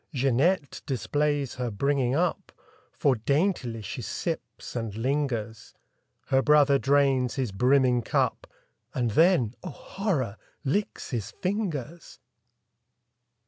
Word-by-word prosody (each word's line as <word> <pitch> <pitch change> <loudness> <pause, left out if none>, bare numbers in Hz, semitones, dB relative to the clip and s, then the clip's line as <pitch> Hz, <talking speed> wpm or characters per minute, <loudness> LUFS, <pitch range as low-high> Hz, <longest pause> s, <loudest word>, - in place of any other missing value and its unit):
Jeanette 140 +5 +1
displays 145 +1 0
her 125 -1 -2
bringing 135 +3 +1
up. 175 +2 -1 0.4
For 135 -3 +2
daintily 130 - 0
she 95 - -5
sips - - -5
and 115 -4 -3
lingers. 120 -3 -2 0.5
Her 135 0 +4
brother 145 -1 +5
drains 135 -3 +2
his 130 -6 -1
brimming 125 +3 +3
cup. - - 0 0.5
And 120 -3 0
then—oh, 160 - +2
horror!—licks 155 - -3
his 115 -6 -3
fingers! 170 - -4
135 Hz, 100 wpm, -27 LUFS, 120-150 Hz, 0.5 s, brother